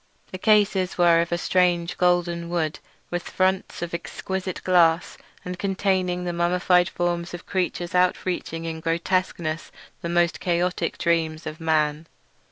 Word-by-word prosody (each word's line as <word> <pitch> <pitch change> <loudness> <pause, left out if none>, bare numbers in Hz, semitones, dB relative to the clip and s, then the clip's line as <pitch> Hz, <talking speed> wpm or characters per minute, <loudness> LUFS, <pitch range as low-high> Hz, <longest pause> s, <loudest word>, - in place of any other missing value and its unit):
The 185 - -6
cases 205 -3 +3
were 170 -1 +5
of 170 - -3
a 175 - +1
strange 175 -1 +1
golden 175 -1 +1
wood, 160 -3 -1 0.3
with 175 0 -1
fronts 185 -1 0
of 170 - -5
exquisite 185 +2 -4
glass, 170 -2 +3 0.3
and 180 0 -5
contained 185 -2 0
the 175 - -2
mummified 180 +1 +2
forms 175 0 -2
of 175 - -11
creatures 180 -2 -2
outreaching 180 -2 0
in 160 -1 -4
grotesqueness 165 -1 -1 0.3
the 170 - -4
most 175 0 +2
chaotic 175 0 -1
dreams 165 -1 0
of 155 0 -6
man. 155 -1 +1
175 Hz, 140 wpm, -24 LUFS, 170-180 Hz, 0.3 s, were